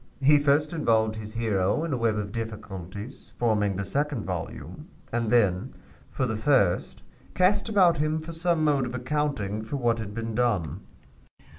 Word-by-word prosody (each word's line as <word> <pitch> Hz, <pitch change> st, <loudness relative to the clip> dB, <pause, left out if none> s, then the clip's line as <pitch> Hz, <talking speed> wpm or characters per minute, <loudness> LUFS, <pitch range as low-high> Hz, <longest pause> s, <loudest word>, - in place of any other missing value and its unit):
He 145 Hz, +2 st, +6 dB
first 145 Hz, +2 st, +2 dB
involved 110 Hz, -8 st, +1 dB
his 110 Hz, 0 st, -6 dB
hero 105 Hz, -, +1 dB
in 165 Hz, -3 st, -2 dB
a -, -, +2 dB
web 115 Hz, -2 st, +1 dB
of 100 Hz, -1 st, -3 dB
difficulties, 105 Hz, -1 st, -7 dB
forming 105 Hz, -4 st, +1 dB
the 100 Hz, +1 st, -3 dB
second 140 Hz, +1 st, -1 dB
volume, 90 Hz, -3 st, -6 dB, 0.3 s
and 115 Hz, -2 st, 0 dB
then, 100 Hz, -6 st, +2 dB, 0.3 s
for 130 Hz, -, -1 dB
the 110 Hz, -3 st, -2 dB
first, 110 Hz, -6 st, +1 dB, 0.3 s
cast 200 Hz, +4 st, +3 dB
about 185 Hz, -6 st, +4 dB
him 155 Hz, +1 st, +1 dB
for 160 Hz, +1 st, -7 dB
some 165 Hz, -1 st, +1 dB
mode 140 Hz, -4 st, +2 dB
of 125 Hz, -, -6 dB
accounting 125 Hz, -6 st, -2 dB
for 110 Hz, +5 st, -5 dB
what 120 Hz, -3 st, +1 dB
had 105 Hz, -2 st, -6 dB
been 115 Hz, 0 st, -4 dB
done." 110 Hz, -8 st, 0 dB
115 Hz, 165 wpm, -26 LUFS, 105-150 Hz, 0.3 s, He